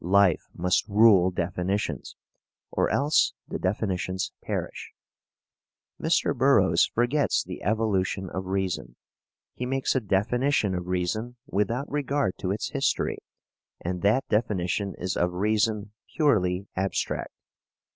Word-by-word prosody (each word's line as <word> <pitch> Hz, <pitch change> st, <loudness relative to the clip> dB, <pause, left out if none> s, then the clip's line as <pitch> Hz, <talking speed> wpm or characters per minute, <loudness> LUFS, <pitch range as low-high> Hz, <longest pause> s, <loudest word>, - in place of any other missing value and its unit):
Life 95 Hz, -1 st, +3 dB
must 90 Hz, +3 st, +1 dB
rule 105 Hz, -4 st, +6 dB
definitions 90 Hz, +3 st, -2 dB, 0.6 s
or -, -, +1 dB
else 145 Hz, +2 st, +3 dB
the -, -, -4 dB
definitions 95 Hz, -1 st, -1 dB
perish. -, -, -5 dB, 1.1 s
Mr. -, -, +2 dB
Burroughs -, -, +4 dB
forgets 125 Hz, +5 st, +1 dB
the -, -, -8 dB
evolution 100 Hz, -3 st, 0 dB
of 95 Hz, +1 st, -5 dB
reason. 95 Hz, -11 st, -2 dB, 0.6 s
He 125 Hz, -, -4 dB
makes 135 Hz, +1 st, 0 dB
a 130 Hz, -, +2 dB
definition 110 Hz, +3 st, +1 dB
of 90 Hz, -1 st, -3 dB
reason 90 Hz, +7 st, -2 dB
without 125 Hz, +2 st, -1 dB
regard 140 Hz, -8 st, 0 dB
to 90 Hz, -, -2 dB
its 105 Hz, +3 st, -2 dB
history, -, -, 0 dB, 0.6 s
and 90 Hz, 0 st, -4 dB
that 110 Hz, +7 st, +2 dB
definition 100 Hz, -3 st, 0 dB
is 90 Hz, 0 st, -3 dB
of 90 Hz, 0 st, 0 dB
reason 105 Hz, +2 st, 0 dB, 0.2 s
purely 100 Hz, -, +2 dB
abstract. 95 Hz, +1 st, -2 dB
100 Hz, 115 wpm, -26 LUFS, 90-115 Hz, 1.1 s, rule